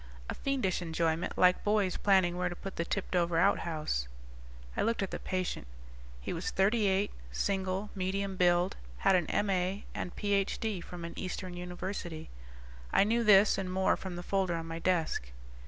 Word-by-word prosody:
A - - -2
fiendish 255 -11 -1
enjoyment 165 0 -1
like 180 0 +4
boys 205 -3 +2
planning 190 -3 +3
where 180 0 0
to 175 - -6
put 195 +2 -7
the 170 - -1
tipped 195 0 -2
over 170 -1 +2
outhouse." 155 - +1 0.7
I - - 0
looked 230 -2 +1
at 190 - -4
the - - -4
patient. 185 - -3 0.5
He - - -4
was - - -2
thirty 205 +2 +2
eight, 195 +1 +1 0.2
single, 190 - -1
medium 195 0 -2
build, 175 0 +3 0.3
had - - +6
an 175 -4 +2
M.A. 195 -1 0
and 175 - -5
Ph.D. 205 0 0
from 170 0 -7
an 170 - -6
eastern 185 -1 -4
university. 180 - -5 0.6
I - - +5
knew 230 +3 +2
this 205 -2 +6
and 185 -1 -3
more 190 +1 +2
from 185 -2 -6
the 175 - -6
folder 190 -2 0
on 165 -1 -4
my 165 0 -5
desk. 165 - 0
185 Hz, 170 wpm, -31 LUFS, 175-195 Hz, 0.7 s, had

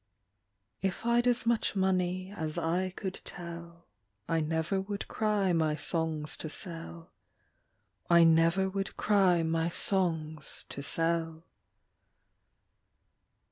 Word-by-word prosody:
If 190 +3 -2
I 235 0 +4
d 250 - +2
as 245 -1 +2
much 230 -3 +1
money 185 0 0
as 160 -4 -3
I 180 +3 0
could 190 0 -6
tell, 170 -1 -8 0.4
I 165 - +1
never 160 +5 -1
would 200 +1 -5
cry 210 -4 +1
my 160 -2 +1
songs 160 -2 -1
to 155 - -5
sell, 165 +1 -4 1.0
I 170 -1 +7
never 165 +3 +4
would 195 0 -4
cry 190 -5 +3
my 165 +1 0
songs 160 -5 -1
to 140 - -6
sell. 165 +1 0
170 Hz, 115 wpm, -30 LUFS, 165-190 Hz, 1.0 s, I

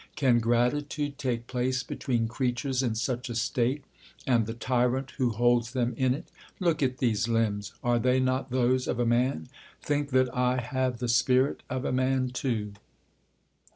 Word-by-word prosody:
Can 125 -4 +3
gratitude 140 +5 0
take 120 -4 -2
place 130 +1 -1
between 120 -5 -1
creatures 130 +2 -1
in 120 -4 -1
such 120 +2 -2
a 120 - -4
state, 120 +4 0 0.4
and 120 -4 +2
the 115 - -4
tyrant 125 +2 0
wh© 125 -2 +2
holds 120 +1 +2
them 125 -2 0
in 130 +1 +2
it? - - -8 0.3
Look 170 -5 +1
at 130 -2 +1
these 115 -4 +1
limbs; 105 -3 0
are 120 0 +2
they 125 +2 +2
not 130 +1 0
those 130 0 +1
of - - -1
a 120 - +2
man? 120 - +1 0.3
Think 145 -1 -1
that 130 -1 +2
1 125 0 +1
have 130 0 -1
the 125 - -3
spirit 130 +3 +2
of 130 +1 -3
a - - 0
man 130 0 +1
too. 120 -6 -2
125 Hz, 170 wpm, -28 LUFS, 120-130 Hz, 0.4 s, Can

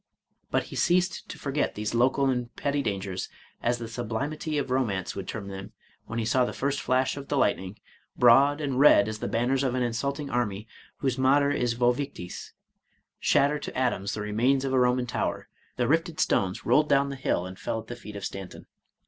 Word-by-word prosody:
But - - +1
he - - -10
ceased 180 +1 +1
to - - -7
forget 145 +1 -1
these 105 +1 -3
local 130 +3 +3
and 125 -2 -2
petty 140 0 0
dangers, 95 -5 -3 0.3
as 120 +1 +1
the 115 -1 -6
sublimity 130 +7 -3
of 135 -3 -2
romance 110 -8 -1
would 100 - -5
term 105 -3 -5
them, 95 0 -8 0.3
when 110 - -5
he 115 - 0
saw 125 +3 +3
the 120 - -2
first 140 +1 -1
flash 130 +2 +1
of 140 -1 -7
the 145 - -1
lightning, 95 -5 0 0.4
broad 140 +5 +6
and 135 -3 -1
red 135 -8 +7
as 110 0 -4
the - - -3
banners 125 +3 +1
of 130 -2 0
an 125 - +1
insulting 140 +5 -2
army 110 -5 -2 0.3
whose 130 -2 0
motto 140 +2 +4
is 120 -4 0
Vce 120 0 +3
victis, 125 -10 -6 0.7
shatter 145 +2 +3
to - - -6
atoms 120 -6 0
the 105 - -4
remains 120 +6 +1
of 135 - -1
a 130 - +4
Roman 125 0 +2
tower; 120 - -2 0.2
— - - -36
the 125 -1 +1
rifted 165 +2 +1
stones 95 -1 +1
rolled 150 0 +4
down 140 0 +3
the 140 - -4
hill, 130 -8 -1
and 95 0 -9
fell 110 - -2
at 110 - -10
the 120 - -7
feet 105 -3 -10
of 100 - -5
Stanton. 95 -2 -7
125 Hz, 210 wpm, -27 LUFS, 110-140 Hz, 0.7 s, red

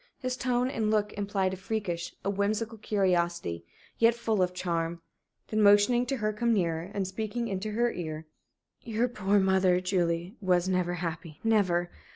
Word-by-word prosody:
His 255 -1 -3
tone 250 -1 0
and 225 -5 -1
look 210 -1 +1
implied 195 -2 -1
a - - -5
freakish, 185 -3 -3
a - - +1
whimsical 215 +3 -1
curiosity, 175 - 0 0.4
yet 230 0 +5
full 225 -4 0
of 180 -1 +2
charm. 170 -2 -2 0.5
Then, 215 0 +1
motioning 210 +4 +5
to 270 - -1
her 215 -2 -1
to 210 - -15
come 235 -1 +3
nearer, 170 -2 -1
and 200 -2 -2
speaking 220 +4 -3
into 200 +1 -3
her 240 +2 +2
ear: 160 -2 -5 0.6
"Your 230 +1 0
poor 205 -4 +1
mother, 190 -1 +3
Julie, 175 -1 0
was 180 -2 +2
never 180 -1 0
happy 165 -2 -5
never! 185 -6 +2
195 Hz, 170 wpm, -29 LUFS, 175-220 Hz, 0.6 s, yet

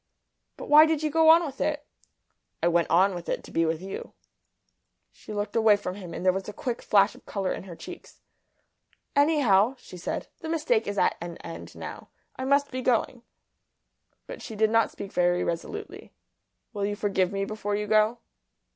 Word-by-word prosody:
"But - - -7
why 305 +2 +8
did 315 -1 0
you 305 - 0
go 320 +1 +5
on 335 +1 +7
with 275 -3 -7
it?" 295 -1 -1 0.8
"I - - +4
went 170 0 +2
on 190 +3 +4
with 175 -1 -7
it - - -2
to - - -13
be 165 0 +1
with 160 +2 -2
you." 195 - -7 1.0
She - - -13
looked 205 0 -3
away 220 -2 +5
from 180 -3 -5
him, 185 -3 -9
and 180 - -6
there 185 - +5
was 195 +1 -4
a - - -7
quick 240 +3 -4
flush 200 0 +3
of - - -18
colour 195 -2 -2
in - - -7
her 175 -3 -9
cheeks. 355 - -11 1.0
"Anyhow," 270 -7 +4
she 180 - -12
said, 170 - -4
"the 320 - -6
mistake 295 -9 +1
is 205 0 -3
at - - +2
an 170 -1 -6
end 165 - -9
now. - - -8 0.3
I 260 - -4
must 280 +1 +2
be 255 0 -3
going." 245 0 0 1.0
But - - -9
she 225 - -8
did 220 +1 +2
not 225 0 +3
speak 200 - -8
very 175 0 +2
resolutely. 415 - -5 0.6
"Will 200 -2 -2
you 205 - -2
forgive 195 -3 0
me 195 0 -2
before 205 -1 -3
you 210 0 -2
go?" 215 +2 +3
210 Hz, 195 wpm, -27 LUFS, 190-265 Hz, 1.0 s, why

